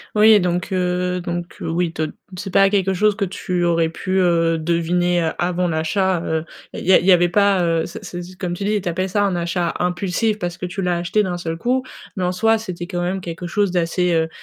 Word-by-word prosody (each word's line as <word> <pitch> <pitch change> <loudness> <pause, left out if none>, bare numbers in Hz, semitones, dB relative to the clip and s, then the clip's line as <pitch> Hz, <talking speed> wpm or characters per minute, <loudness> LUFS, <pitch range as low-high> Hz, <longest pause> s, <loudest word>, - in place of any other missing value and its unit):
Oui, 215 0 +7
donc 180 0 -1
heu, 180 0 0
donc 175 0 -5
heu, - - -5
oui 170 0 0
te 155 -1 -2 0.3
c'est 195 - -5
pas 195 +1 +5
quelque 190 -2 +2
chose 210 +2 +3
que 200 -1 -1
tu 180 -1 -2
aurais 170 -1 +2
pu, 185 +3 -3
heu, 165 -2 +2
deviner, 175 +2 +1
heu, 160 - 0
avant 180 +1 0
l'achat, 175 +3 0
heu 160 0 -2 0.3
et - - -5
il - - -8
y 190 - +5
a - - +8
il - - -4
y 190 - +6
avait 175 -1 +5
pas, 200 0 +3
heu, 165 -1 +1
ce 170 - -9
ce 175 - -6
ce 180 +1 -11
comme 180 -2 -3
tu 175 - -5
dis, 210 +1 +1
tu - - -6
appelles 185 +3 -2
ça 205 +2 +1
un 195 -3 +1
achat 175 0 -1
impulsif 180 +5 0
parce 175 -3 -4
que - - -3
tu 180 +2 -5
l'as 180 -1 +1
acheté 175 +5 +1
d'un 180 -3 -2
seul 165 -1 -4
coup, 250 +8 0 0.3
mais 185 - -2
en 180 - +1
soi, 225 +4 +2
c'était 180 -5 -6
quand 175 -1 -3
même, 185 +2 -2
quelque 170 0 -6
chose 200 +2 0
d'assez, 175 0 +1
heu, 160 -1 +1
180 Hz, 250 wpm, -20 LUFS, 170-190 Hz, 0.3 s, a